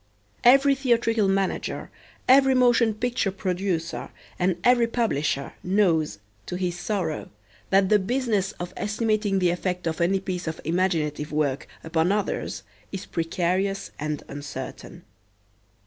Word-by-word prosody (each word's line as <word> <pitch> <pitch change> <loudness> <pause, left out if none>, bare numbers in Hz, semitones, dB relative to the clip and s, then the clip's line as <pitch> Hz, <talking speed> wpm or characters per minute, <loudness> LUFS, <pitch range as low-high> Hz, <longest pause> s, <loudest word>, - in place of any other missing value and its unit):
Every 275 +3 +6
theatrical 230 -5 +2
manager, 195 0 -1 0.4
every 265 0 +6
motion 240 -3 +4
picture 240 -2 0
producer, 185 -3 -2 0.3
and 180 -1 +1
every 240 -1 +5
publisher 150 - -1
knows, 175 - +2 0.3
to - - -4
his 180 -1 -2
sorrow, 175 -7 -2 0.4
that 195 -1 +4
the 210 - +5
business 215 -2 0
of 175 +1 -7
estimating 215 -1 0
the 180 -2 +3
effect 180 0 -2
of 165 +1 -2
any 190 +3 +3
piece 185 -3 -4
of 160 - -3
imaginative 160 -3 0
work 145 -3 -1 0.2
upon 160 +2 +1
others 205 0 -2 0.3
is 195 - -5
precarious 180 +4 -1
and 150 -1 -3
uncertain. 145 0 -8
190 Hz, 125 wpm, -25 LUFS, 170-215 Hz, 0.4 s, Every